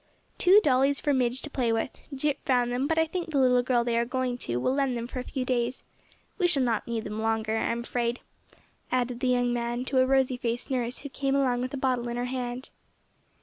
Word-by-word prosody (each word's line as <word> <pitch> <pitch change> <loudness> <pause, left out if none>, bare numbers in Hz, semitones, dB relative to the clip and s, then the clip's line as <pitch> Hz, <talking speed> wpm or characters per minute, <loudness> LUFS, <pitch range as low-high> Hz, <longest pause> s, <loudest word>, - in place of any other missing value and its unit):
"Two 385 +3 +7
dollies 275 -1 +3
for 290 - +1
Midge 255 -1 +1
to 300 - -5
play 245 -5 0
with. 225 +3 0 0.2
Jip 280 +1 -1
found 245 -2 +2
them, 255 +3 0
but 320 - 0
I 320 - +4
think 340 +1 -4
the 300 - -1
little 250 -2 +4
girl 245 -1 +1
they 235 -1 0
are - - +2
going 250 +1 -1
to 120 - -2
will 190 - +1
lend 270 -3 0
them 235 - -3
for 255 +1 -6
a - - -3
few 255 0 -4
days. 245 0 -1 0.6
We 360 - +4
shall 280 -6 +2
not 230 -2 0
need 230 -2 -2
them 210 +1 -4
longer 220 0 0
I'm 230 +1 -1
afraid," 235 0 -2 0.7
added 245 -1 0
the 255 - 0
young 245 -1 +2
man 240 +1 -2
to 260 0 +1
a 255 - +4
rosy 265 -1 +2
faced 240 0 -2
nurse 245 -1 -1
who 285 - -7
came 275 +1 -1
along 255 -3 +2
with 255 +2 -3
a - - -4
bottle 255 -2 0
in 235 - -3
her 245 - -1
hand. 250 0 -4
250 Hz, 235 wpm, -27 LUFS, 240-265 Hz, 0.7 s, Two